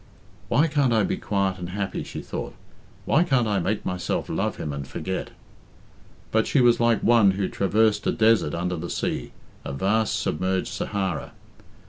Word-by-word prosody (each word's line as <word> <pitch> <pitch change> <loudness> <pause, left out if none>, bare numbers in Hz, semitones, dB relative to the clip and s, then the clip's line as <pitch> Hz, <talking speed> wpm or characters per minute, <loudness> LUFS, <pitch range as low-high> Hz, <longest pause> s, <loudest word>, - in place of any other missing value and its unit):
"Why 150 - +3
can't 145 -5 +1
I 110 -2 +3
be - - -1
quiet 95 -2 -1
and 90 -1 -5
happy?" 100 +1 -3
she - - -7
thought. - - -6 0.5
"Why 160 - +4
can't 130 -9 +2
I 100 -2 +1
make 100 +4 -2
myself 90 0 -2
love - - -1
him 75 - -4
and 70 -1 -5
forget?" 95 +7 -4 1.0
But 110 0 +2
she 145 - +2
was 120 -2 +5
like 115 -1 +2
one 115 -4 +5
who 95 0 -1
traversed 105 +2 +1
a - - +3
desert 110 -9 +3
under 90 +1 -2
the 85 +2 -5
sea - - -3 0.3
a - - -5
vast 105 +9 +1
submerged 95 +3 -1
Sahara. 95 -5 -3
100 Hz, 170 wpm, -25 LUFS, 90-115 Hz, 1.0 s, was